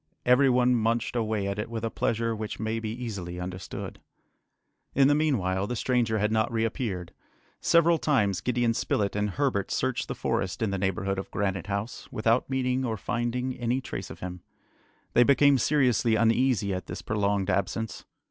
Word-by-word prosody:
Every 125 +2 +5
one 125 0 +4
munched 115 +1 0
away 110 -3 0
at 100 +1 -3
it 105 - -3
with 115 -1 -4
a 115 - -2
pleasure 115 0 0
which 110 -1 -5
may 110 +1 -1
be 110 -1 -4
easily 100 -7 -5
understood. 90 0 -6 1.0
In 135 0 +6
the 145 - +4
meanwhile, 100 -11 +1
the 125 - -3
stranger 120 -2 +1
had 105 +1 +1
not 110 +1 +1
reappeared. 110 -5 -2 0.5
Several 170 0 +4
times 100 - +1
Gideon 120 -1 +1
Spilett 100 -3 -1
and 105 0 0
Herbert 125 -4 0
searched - - -1
the - - -4
forest 95 +3 -1
in 105 - 0
the 100 - -2
neighbourhood 95 0 -1
of 95 - -6
Granite 95 -2 -2
House, 100 +3 -4
without 115 +4 +1
meeting 130 -1 0
or 115 -3 -2
finding 125 +3 -2
any 120 +2 0
trace 130 - -6
of - - -10
him. 90 -1 -6 0.7
They - - +5
became 140 +1 +5
seriously 125 -5 +3
uneasy 115 -2 +2
at 95 - -5
this - - -6
prolonged 100 -3 0
absence. 105 +4 -2
115 Hz, 175 wpm, -27 LUFS, 100-125 Hz, 1.0 s, In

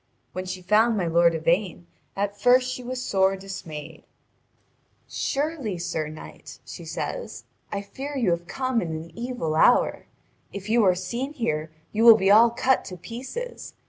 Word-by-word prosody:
When 185 0 -4
she 185 0 -5
found 220 +4 +3
my 185 - 0
lord 170 0 +4
Yvain, 170 +2 0 0.3
at 200 +1 -3
first 250 +2 +4
she 255 - -6
was 255 +1 -4
sore 195 -5 +1
dismayed. 170 -6 -8 1.0
"Surely, 275 - -2
sir 170 -3 -3
knight," 155 +1 -11
she - - -9
says, - - -5 0.3
"I 200 0 -3
fear 275 +7 -6
you 225 -9 +2
have 170 0 -2
come 255 0 -1
in - - -3
an 160 +1 -6
evil 240 -9 -3
hour. 160 +10 +3 0.4
If 200 +1 -7
you 230 0 +4
are 185 -1 +4
seen 240 +10 -4
here, 155 - -2 0.2
you 220 +1 0
will 230 -2 +10
be 195 -1 +3
all 225 +3 +7
cut 255 +3 +1
to 185 - -8
pieces. 260 - -7
200 Hz, 165 wpm, -25 LUFS, 175-245 Hz, 1.0 s, will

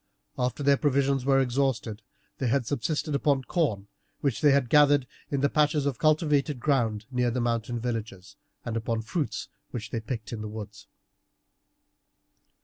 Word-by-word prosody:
After 125 +3 -2
their 140 0 +4
provisions 140 -2 +1
were 135 -1 +4
exhausted 125 -4 0 0.4
they 130 - 0
had 125 +1 +1
subsisted 150 +4 -2
upon 140 -1 +2
corn 120 - -1 0.3
which 140 -5 0
they 140 -2 +6
gathered 145 +1 +4 0.2
in 140 -2 -1
the 140 - +4
patches 150 0 +2
of 135 -5 -1
cultivated 150 -3 +2
ground 115 -6 0
near 125 -1 +1
the 120 +2 -1
mountain 120 0 -1
villages, 110 -5 -5 0.3
and 115 - -3
upon 115 0 -2
fruits 145 +6 -3 0.2
which 115 -4 -6
they 115 - -1
picked 110 -1 -5
in 110 - -5
the 105 - -5
woods. 105 -1 -9
130 Hz, 150 wpm, -27 LUFS, 115-140 Hz, 0.4 s, they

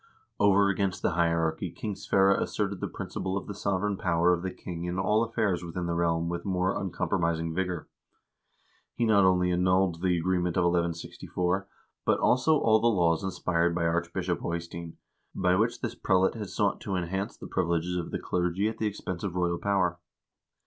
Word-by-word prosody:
Over 100 0 +5
against 100 -1 -1
the - - +2
hierarchy 85 -1 0
King 105 - -5
Sverre 95 0 +3
asserted 100 -1 -2
the - - -2
principle 95 +1 -4
of 100 - -5
the 105 - -6
sovereign 100 0 -1
power 85 0 +2
of 85 - -1
the 95 - -2
king 85 -1 -7
in 90 +1 -3
all 105 +4 +2
affairs 110 -6 0
within 85 +1 -4
the 85 - -1
realm 85 0 +1
with 85 0 -3
more 95 0 0
uncompromising 85 -3 -1
vigor. 90 -2 -2 1.1
He 120 - +1
not 100 -3 +5
only 90 -1 +3
annulled 90 -1 +2
the 90 -2 +2
agreement 90 0 0
of 90 - +3
1164, 90 +2 -1 0.4
but - - +2
also 145 +5 +3
all 110 -5 +4
the 115 - +2
laws 85 -5 +2
inspired 85 -2 0
by 85 -1 0
Archbishop 85 +2 -1
Eystein, 85 0 -5 0.4
by 90 -1 +2
which 110 +5 0
this - - -2
prelate 95 0 +2
had 105 -4 -6
sought 100 -2 0
to 100 - -3
enhance 95 +4 -3
the - - -9
privileges 85 -1 -1
of 85 -2 -3
the - - -2
clergy 90 +3 0
at 110 0 -4
the 110 - +1
expense 95 -3 -5
of 95 -3 -3
royal 85 -1 0
power. 95 -3 +1
90 Hz, 180 wpm, -28 LUFS, 85-100 Hz, 1.1 s, Over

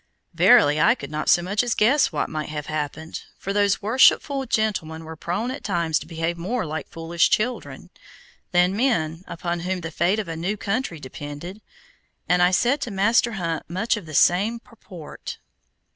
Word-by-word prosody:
Verily 145 +1 +5
I 225 +8 +5
could 140 - -9
not 155 0 -2
so 175 - +5
much 200 +4 0
as 240 -2 -1
guess 260 +7 +3
what - - -1
might 155 -1 -5
have 150 -1 -5
happened, 155 +1 -4 0.2
for 195 - -4
those 205 0 +1
worshipful 265 +4 +3
gentlemen 190 -9 -1
were 160 0 -8
prone 200 +10 -3
at 265 - -7
times 165 -2 0
to - - -11
behave 165 +1 -3
more 195 +4 -2
like 155 -1 -5
foolish 165 +1 0
children, 240 +3 -2 0.6
than 180 +1 +3
men 175 -9 0
upon 170 0 -3
whom 180 +1 -3
the 165 -1 -6
fate 175 +5 +1
of 215 -3 -3
a 165 - -4
new 180 +6 -2
country 200 - -2
depended, 145 +8 -8 0.7
and 180 0 +3
I 180 - +6
said 245 +9 +2
to 245 - -3
Master 225 +4 +2
Hunt 165 -6 -3
much 190 +8 0
of 205 -7 -8
the 155 - -7
same 205 +10 +3
purport. 195 -9 -10
180 Hz, 180 wpm, -23 LUFS, 160-215 Hz, 0.7 s, I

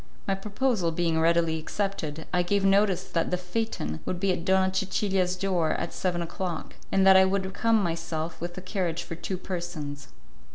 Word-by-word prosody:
My 195 - +2
proposal 205 -1 0
being 165 -1 +1
readily 165 -1 +3
accepted, 160 -3 -3
I 180 - +4
gave 195 +2 +1
notice 195 -1 +4
that 165 - -1
the 180 - 0
phaeton 180 - -3
would 180 - -3
be 195 0 +2
at 170 - -4
Donna 190 0 +3
Cecilia's 190 -1 +1
door 180 -4 +1
at 170 - -3
seven 175 -2 -1
o'clock, 170 -1 -4 0.2
and 195 0 +4
that 190 0 +8
I 190 - +8
would 190 0 -1
come 225 0 +3
myself 165 -1 -3
with 175 +1 -5
a - - -4
carriage 180 -3 -2
for - - -7
two 185 +3 -4
persons. 170 -6 -5
180 Hz, 180 wpm, -27 LUFS, 165-195 Hz, 0.2 s, that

